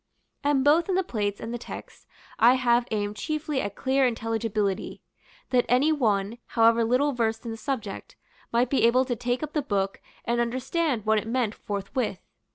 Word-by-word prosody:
And 285 -2 +2
both 315 +6 +4
in 375 - +2
the 380 - +2
plates 205 - -2
and 230 - -5
the 240 - -4
text - - -10 0.3
I 240 +3 +7
have 240 -1 +2
aimed 205 -1 -2
chiefly 305 +3 -2
at 200 0 -4
clear 265 0 +2
intelligibility; 225 -4 -2 0.5
that 250 -2 +4
any 260 +6 +4
one, 220 -6 0
however 230 0 +4
little 255 +6 +2
versed 225 -1 -1
in 230 - -4
the - - -4
subject, 225 -3 -5 0.4
might 240 +1 +2
be 275 - +2
able 255 +2 +3
to 245 -2 -1
take 245 +3 -2
up 305 - -5
the 300 - +1
book, 195 -7 -2 0.2
and 235 0 +1
understand 255 +1 -1
what 220 0 +3
it 215 - -7
meant 235 -2 0
forthwith. 205 +1 -3
235 Hz, 180 wpm, -26 LUFS, 220-265 Hz, 0.5 s, I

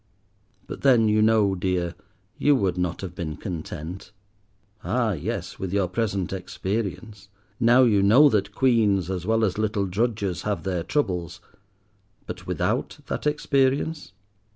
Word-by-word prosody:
But - - -8
then 120 -5 +5
you 105 0 +3
know, 110 -2 +3
dear, 90 -2 -1 0.5
you 145 0 +4
would 95 -9 0
not 90 -1 -2
have 95 -3 -6
been 85 -5 -5
content. 90 0 -7 0.7
Ah 110 +5 0
yes, 80 -7 -4
with 95 -2 -4
your 100 -2 +1
present 95 -2 -2
experience—now 100 +3 -1
you 105 -5 +4
know 115 +10 +7
that 100 -5 0
Queens 105 -8 +2
as 90 0 -4
well 115 0 +3
as 100 +1 -2
little 105 -2 0
drudges 100 -1 -1
have 105 -1 -2
their 90 -3 -1
troubles; 90 - -2 0.9
but - - -8
without - - -1
that - - -3
experience? 145 -3 0
100 Hz, 135 wpm, -24 LUFS, 90-115 Hz, 0.9 s, know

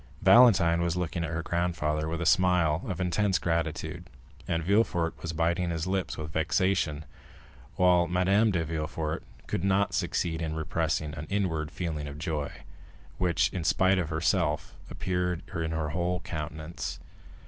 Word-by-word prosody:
Valentine 95 -9 +6
was 85 0 0
looking 85 -1 -2
at 80 - -2
her 80 +1 -3
grandfather 80 -3 -1
with 80 0 -3
a 85 - -2
smile 90 -3 +3
of 95 -3 -3
intense 95 +2 +1
gratitude, 80 -2 -2 0.4
and 85 -1 0
Villefort 90 -3 +2
was 85 - -3
biting 85 +2 0
his 80 -1 -2
lips 95 0 -2
with 75 -1 -6
vexation, 80 -1 +1 0.7
while 90 0 +4
Madame 95 +5 +3
de 85 -5 0
Villefort 80 0 -3 0.2
could - - -3
not 100 +1 +2
succeed 80 -1 -1
in 80 -1 -2
repressing 80 -1 -1
an 75 0 -7
inward 85 -7 -1
feeling 80 -4 -4
of 70 0 -7
joy, 75 -2 -3 0.7
which, 85 -3 +2
in 90 - -3
spite 95 +3 +3
of 85 -3 -2
herself, 80 -1 0 0.2
appeared 90 -2 -2
in 80 -1 -2
her 80 -2 -2
whole 90 +3 -1
countenance. 80 +1 -5
85 Hz, 150 wpm, -28 LUFS, 80-90 Hz, 0.7 s, Valentine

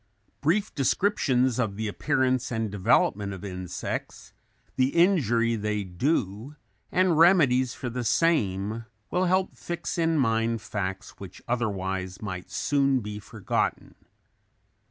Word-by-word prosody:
Brief 195 +8 +1
descriptions 130 - +1
of 110 -5 0
the 110 +1 -3
appearance 130 +2 0
and 110 -3 -2
development 100 0 +2
of 95 +1 -8
insects, 90 -2 -5 0.4
the 130 +2 +1
injury 120 - +3
they 105 -1 -2
do, 105 - -2 0.4
and 180 -4 +3
remedies 140 -8 +5
for 130 - -5
the 120 +1 -3
same, 110 - +1 0.3
will 180 +1 +1
help 185 +1 +1
fix 175 0 -4
in 165 -1 +2
mind 115 -3 +1
facts 95 -2 -5
which 95 -3 -10
otherwise 95 -6 -2
might 95 -3 -6
soon 135 +5 +1
be 105 0 -6
forgotten. 100 - -2
115 Hz, 120 wpm, -26 LUFS, 100-145 Hz, 0.4 s, remedies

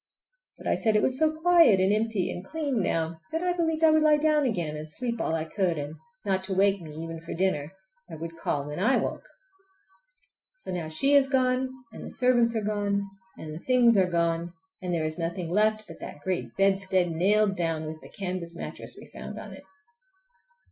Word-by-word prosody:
But - - -13
I - - +2
said 220 -3 +1
it 210 - +3
was 260 0 +1
so 315 0 +4
quiet 335 - +6
and 190 +2 +3
empty 215 -3 0
and 180 - -6
clean 280 -1 -2
now 165 -2 -1
that 325 +2 -2
I 360 0 +1
believed 325 -2 0
I 320 - +7
would 310 0 +4
lie 305 -1 +5
down 300 -2 +2
again 170 -9 -2
and 155 +1 -7
sleep 235 +3 -3
all 160 - 0
I 160 -1 -2
could; 175 -1 0
and 145 +1 -4 0.3
not 190 -1 0
to 190 -1 -3
wake 195 0 +3
me 160 - -9
even 165 0 -6
for 165 - -6
dinner—I 190 +1 -4
would 165 +1 -7
call 145 -3 -2
when 150 +3 -5
I 225 +8 +3
woke. - - -2 1.4
So - - -8
now 175 -3 -3
she 275 - +2
is 275 -1 +5
gone, 255 -1 +2 0.2
and - - -9
the - - -7
servants 240 -2 +2
are 220 - -1
gone, 200 -1 -1 0.3
and 155 -1 -7
the 155 - -6
things 245 -2 +4
are 190 -2 +3
gone, 170 0 0 0.3
and 180 -1 -3
there 165 -2 0
is 155 +2 -4
nothing 170 0 -3
left 215 +2 +2
but - - -11
that 145 - -9
great 185 +1 -2
bedstead 195 -2 +2
nailed 200 +4 +2
down, 165 -3 -1
with 155 0 -7
the - - -13
canvas 180 -3 -5
mattress - - -5
we - - -11
found - - -9
on - - -8
it. - - -12
190 Hz, 210 wpm, -27 LUFS, 165-240 Hz, 1.4 s, I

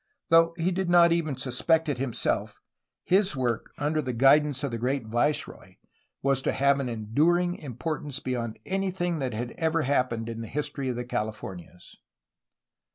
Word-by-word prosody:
Though 165 0 +5
he 175 +2 0
did 185 0 -1
not 170 -1 +6
even 165 -4 0
suspect 155 +6 +1
it 140 -4 -2
himself, 130 -3 -2 0.4
his 190 -3 +2
work, 120 -3 -2
under 155 +1 0
the 130 -3 -3
guidance 135 +3 +4
of 140 - -1
the 115 - -3
great 130 +1 -1
viceroy, 120 +7 -1 0.5
was 135 -1 +2
to - - 0
have 140 0 +3
an 130 -2 -2
enduring 155 +11 +1
importance 145 +1 -4
beyond 120 -4 -3
anything 185 -3 -1
that 130 -5 -2
had 120 +2 -4
ever 160 -1 +1
happened 125 -4 0
in 115 0 -5
the 115 - -6
history 145 +1 -2
of 125 - -2
the 120 +1 -4
Calif 110 -3 -3
ornias. 90 -1 -10
140 Hz, 165 wpm, -27 LUFS, 120-165 Hz, 0.5 s, not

